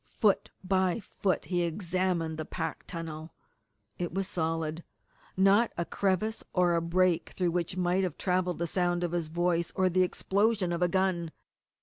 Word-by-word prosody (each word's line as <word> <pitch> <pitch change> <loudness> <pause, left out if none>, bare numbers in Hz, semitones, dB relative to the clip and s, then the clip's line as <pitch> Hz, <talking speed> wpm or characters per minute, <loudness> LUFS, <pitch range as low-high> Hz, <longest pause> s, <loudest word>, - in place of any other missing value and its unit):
Foot 205 -3 +3
by 185 +1 +1
foot 195 -2 -2
he 175 -1 0
examined 170 -2 -1
the - - -1
packed 160 0 -5
tunnel. 160 -1 -6 0.6
It 175 -1 -2
was 195 +1 -2
solid 165 -1 -2 0.5
not 195 +5 +5
a 170 - 0
crevice 200 +4 0
or 180 -2 +3
a 170 - +2
break 175 0 +2
through 180 -2 +1
which 175 +1 -2
might 180 +1 +2
have 180 -5 -2
travelled 180 -1 0
the 170 - -1
sound 175 0 0
of 175 - -1
his 170 -2 -1
voice 170 +1 0
or 185 -1 +3
the 185 +1 +2
explosion 195 +1 +1
of 170 - -2
a 180 - +4
gun. 185 -2 0
180 Hz, 165 wpm, -29 LUFS, 170-185 Hz, 0.6 s, not